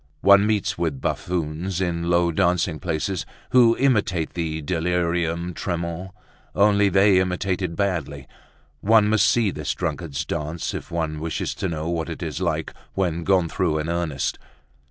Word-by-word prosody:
One 100 +1 +6
meets 105 -2 0
with 80 -6 -1
buffoons 85 +4 -2
in 85 -2 -1
low 85 0 +3
dancing 85 -2 +1
places 90 +1 -2 0.3
who 120 -2 +5
imitate 100 - +1
the 80 -2 -2
delirium 85 +1 -1
tremens, 85 +1 -4 0.5
only 100 0 +4
they 95 -1 +5
imitate 95 +1 -1
it 85 -3 -2
badly. 80 -8 -2 0.5
One 110 +3 +4
must 105 -1 +4
see 110 -2 +2
this 75 -4 -3
drunkard's 70 +3 -3
dance 75 +3 -3
if - - -6
one 80 -3 -2
wishes 80 +1 -3
to - - -3
know 80 -1 -3
what 85 -1 -2
it 80 - -6
is 80 +1 -4
like 80 -3 -1 0.2
when 85 -3 0
gone 95 -2 +3
through 80 -2 0
in 75 +1 -2
earnest. 85 -5 -2
85 Hz, 155 wpm, -23 LUFS, 80-95 Hz, 0.5 s, One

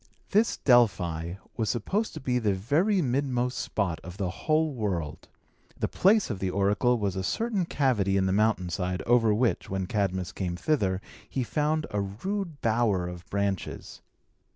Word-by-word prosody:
This 215 +3 +3
Delphi 90 - +2 0.2
was 110 -2 0
supposed 195 - -1
to - - -5
be 125 -2 0
the 105 -4 +1
very 165 - +2
midmost 125 -1 0
spot 95 -6 -1
of 90 +2 -9
the 95 -4 -1
whole 155 +7 +1
world. 95 - -3 0.5
The - - 0
place 200 - +3
of 100 - -4
the 95 - -1
oracle 105 +6 +2
was 100 -3 -1
a 95 - -2
certain 205 - 0
cavity 105 - +1
in 95 - +2
the 95 - +1
mountain 105 -3 +2
side, 90 +1 -2
over 115 -2 +4
which, 115 +3 +1
when 95 -1 -2
Cadmus 95 -2 -1
came 90 -3 -3
thither, 95 - 0 0.3
he 130 - -1
found 150 +4 0
a 105 - 0
rude 160 - -4
bower 110 -6 +1
of 90 0 -9
branches. 100 -2 -3
105 Hz, 165 wpm, -27 LUFS, 95-135 Hz, 0.5 s, over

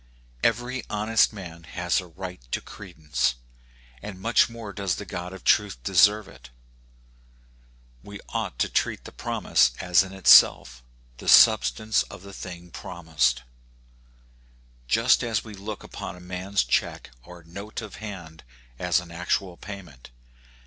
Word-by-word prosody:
Every 120 +3 0
honest 110 +1 +2
man 90 -6 -9
has 90 +1 -1
a 90 - -12
right 90 -2 -8
to - - +1
credence, 75 -10 -3 0.7
and 105 -3 -8
much 115 +5 +3
more 115 -3 -8
does 100 -4 -1
the 105 - -7
God 90 0 -6
of 95 -1 -11
truth 105 -6 +3
deserve 105 +5 +4
it. 60 - -15 1.5
We 100 +6 -10
ought - - -3
to - - +1
treat - - -1
the - - -10
prom 115 -4 -5
ise 60 -6 +4
as 90 0 +4
in 95 -1 -5
itself 65 -9 +6 0.4
the - - -4
substance 110 - +5
of 90 - -9
the 100 0 -11
thing 90 -2 -9
promised, 80 -10 -1 1.4
just - - +3
as 115 -3 -1
we 110 - -10
look 100 +1 -7
upon - - -7
a - - -13
man's 95 +2 -2
check - - -1
or 85 +6 -13
note 100 +6 -8
of 105 - -9
hand 90 -7 -9 0.4
as 90 -1 +2
an 90 -1 -11
actual 90 +1 -2
payment. 90 -11 -11
90 Hz, 145 wpm, -25 LUFS, 85-105 Hz, 1.5 s, itself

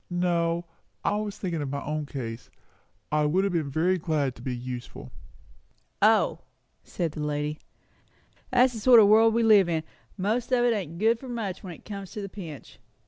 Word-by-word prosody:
"No 175 -1 0 0.4
I 205 - +1
was 210 -1 -4
thinking 170 -5 -3
of 145 - -3
my 140 +1 -4
own 150 0 -3
case. 120 -5 -6 0.6
I 150 0 +2
would 185 +6 +2
have 200 -2 0
been 160 -4 -1
very 175 +6 +1
glad 150 -5 0
to - - -14
be 130 -2 -3
useful." 120 - -7 0.9
"O!" - - +4 0.4
said 170 -3 -3
the 155 - -8
lady. 150 0 -2 0.9
"That's 255 0 +4
the 225 - -6
sort 240 +1 +7
o' 215 - +8
world 220 +2 +5
we 230 - +3
live 205 -5 +6
in; 160 -2 0 0.3
most 220 +7 -1
of 245 -1 +3
it 240 - +3
ain't 170 -6 -4
good 225 +4 +2
for 260 - -9
much 215 -6 -4
when 185 -4 -7
it - - -20
comes 200 -3 -7
to 215 - -5
the 195 - -6
pinch. 165 -8 -10
175 Hz, 195 wpm, -27 LUFS, 150-215 Hz, 0.9 s, o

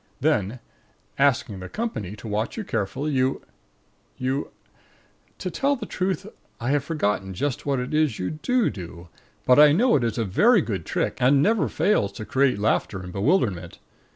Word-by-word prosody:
Then, 105 +4 +1 0.6
asking 125 -8 +2
the 90 0 -8
company 110 - -4
to 110 - -10
watch 110 - -2
you 220 - -3
carefully, 115 - -2
you 130 -1 0 0.7
you 130 +2 -2 0.9
To - - -4
tell 280 +1 +1
the 240 -5 -6
truth, 190 0 -2 0.3
I 120 +3 -1
have 145 -1 +1
forgotten 105 - -1
just 145 +7 -3
what 140 -2 +1
it 125 +4 -4
is 150 -7 +2
you 90 - -3
do 240 +10 0
do, 85 -2 -9 0.4
but 125 +2 +6
I 150 -1 +8
know 235 +9 +3
that - - -3
it - - +2
is - - -10
a 115 - 0
very 205 - +4
good 95 - -4
trick, - - -1
and 135 +3 +4
never 220 0 +2
fails 200 - +1
to 110 - -7
create 135 -2 +2
laughter 100 -2 0
and 90 0 -8
bewilderment. 100 - 0
130 Hz, 180 wpm, -24 LUFS, 100-155 Hz, 0.9 s, I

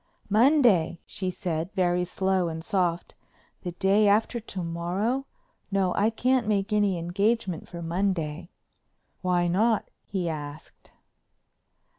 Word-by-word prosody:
"Monday," 220 - +4
she 185 -1 -3
said 175 -1 -3
very 180 -2 +1
slow 190 0 0
and 160 0 -5
soft, 175 -2 -1 0.5
"the 175 -2 -5
day 200 +3 +3
after 220 +4 +2
to 195 -5 -6
morrow? 185 +11 -1 0.4
No, 195 -2 +1
I 210 +2 +2
can't 250 +1 +1
make 205 0 0
any 205 -3 +2
engagement 190 +1 -1
for 170 -1 -7
Monday." 170 -2 -2 0.7
"Why 180 -1 +2
not?" 210 +6 +1
he 185 -3 -3
asked. 150 -2 -7
185 Hz, 120 wpm, -27 LUFS, 170-210 Hz, 0.7 s, Monday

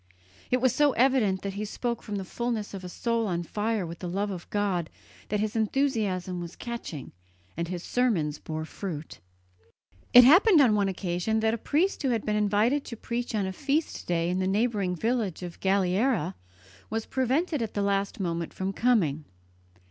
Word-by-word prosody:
It 250 - +3
was 255 -2 +3
so 290 0 +3
evident 235 -7 +2
that 200 -1 -3
he 205 +2 -4
spoke 235 +2 -3
from 210 - -5
the 195 -1 -3
fullness 230 0 -3
of 190 -1 -6
a 180 - -6
soul 230 +3 -1
on 175 -2 -1
fire 210 +3 -1
with 170 0 -8
the 180 - -4
love 200 +3 -1
of 180 -3 -7
God 195 -5 0 0.4
that 210 - 0
his 215 +1 -1
enthusiasm 215 -7 0
was 170 0 -7
catching, 235 - -6 0.4
and 170 +1 -2
his 180 0 -5
sermons 185 -13 0
bore 155 0 -5
fruit. 160 -3 -6 0.9
It 245 - +10
happened 350 - +7
on 250 -6 +6
one 205 -1 +2
occasion 185 +3 -1
that 220 0 +2
a - - 0
priest 335 - +1
who 270 - +1
had 230 -3 0
been 210 - 0
invited 210 +7 +2
to 230 - -7
preach 240 +1 -3
on 205 -2 +1
a 190 - -3
feast 290 - -1
day 170 0 +1
in 185 - 0
the 185 - 0
neighbouring 200 -2 +1
village 220 -3 -1
of 175 -1 -7
Galliera 190 - +1 0.6
was 225 0 -2
prevented 270 +4 0
at 225 - -4
the 205 - +1
last 200 0 0
moment 170 -3 -3
from 190 +1 -2
coming. 180 - +2
205 Hz, 185 wpm, -27 LUFS, 180-240 Hz, 0.9 s, It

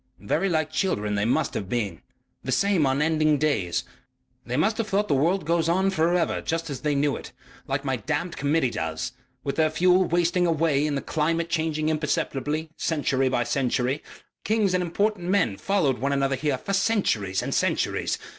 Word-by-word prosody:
"Very 150 - 0
like 155 -2 0
children 105 - 0
they 100 0 0
must 140 +5 +1
have 95 - -4
been. 100 -8 -2 0.4
The - - -3
same 195 -7 +2
unending 155 +2 +2
days. 125 - 0 0.6
They 125 +2 -3
must 215 +9 +1
have 225 - 0
thought 205 +1 +1
that - - +1
the 135 - +2
world 170 +3 +1
went 165 -1 +2
on 190 +3 +2
for 170 -1 +2
ever 175 - 0
just 165 -1 -2
as 135 - -5
they 150 -1 0
knew 140 0 +1
it - - -9 0.4
like 135 +1 -2
my 135 -2 0
damned 170 - -3
Committee 140 -2 +1
does.... 80 +6 -3 0.3
With 140 - -3
their 160 -1 +3
fuel 180 +3 +3
wasting 175 +1 +2
away 155 -3 +2
and 145 -2 -1
the - - -4
climate 165 +2 -1
changing 160 -2 0
imperceptibly, 155 0 -1
century 135 -4 0
by 120 -2 +1
century.... 125 +2 0 0.4
Kings 215 -3 +1
and 180 - +2
important 180 +1 -1
men 185 - +2
followed 145 - 0
one 140 +2 0
another 135 -1 +1
here 140 0 -1
for 195 - -4
centuries 190 - +1
and - - -3
centuries.... - - 0
155 Hz, 185 wpm, -25 LUFS, 135-175 Hz, 0.6 s, their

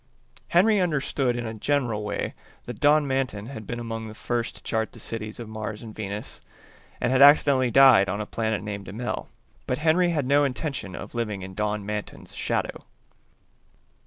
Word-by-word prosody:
Henry 205 +4 +4
understood 140 -7 0
in 120 0 -3
a 110 - -4
general 120 -2 0
way 105 - -3 0.3
that 120 -3 -7
Don 150 +1 +4
Manton 130 -6 -1
had 110 -5 -8
been 120 - -4
among 115 -1 -5
the 110 - -9
first 120 0 -2
to - - -13
chart 110 -1 -2
the - - -12
cities 110 -1 -5
of 120 - -6
Mars 110 0 -6
and 110 -2 -9
Venus, 105 -1 -6 0.6
and 120 - 0
had 130 +1 +3
accidentally 140 -3 +6
died 125 -6 +7
on 100 +3 -2
a 105 - -2
planet 110 -3 -2
named 100 -2 -6
Immel; 115 +7 -4 0.4
but 125 - 0
Henry 165 +3 +3
had 150 -6 0
no 140 +2 +4
intention 135 - -3
of - - -8
living 105 -5 -3
in 95 0 -8
Don 105 0 -2
Manton's 105 0 -6
shadow. - - -2
115 Hz, 180 wpm, -25 LUFS, 105-135 Hz, 0.6 s, died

